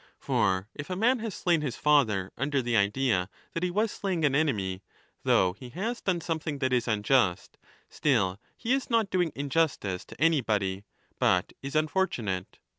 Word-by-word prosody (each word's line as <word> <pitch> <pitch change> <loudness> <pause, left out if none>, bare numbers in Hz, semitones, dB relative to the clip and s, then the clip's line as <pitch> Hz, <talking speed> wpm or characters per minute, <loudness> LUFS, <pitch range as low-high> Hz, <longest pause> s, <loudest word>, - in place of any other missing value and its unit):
For 95 0 0
if 145 - -7
a 185 - -2
man 240 +6 +3
has 220 -3 -4
slain 170 -3 +1
his 140 -6 -3
father 110 -11 +2
under 140 0 0
the 120 -1 0
idea 100 -2 +2 0.2
that 165 - -2
he 180 - +1
was 210 +4 0
slaying 185 -6 -1
an 140 - +2
enemy, 100 -11 0 0.4
though 90 -1 +3
he 125 +5 -11
has 230 +6 -2
done 180 -3 0
something 160 -3 -3
that 130 -2 0
is 125 -1 +1
unjust, 105 -3 +1 0.3
still 100 -10 +1 0.2
he 235 +2 0
is 270 -1 -1
not 225 -4 +2
doing 175 -3 +1
injustice 140 - 0
to - - -13
anybody, 105 -11 +1 0.3
but 90 -1 +2
is 135 +2 -6
unfortunate. 145 - -1
140 Hz, 170 wpm, -28 LUFS, 100-170 Hz, 0.4 s, man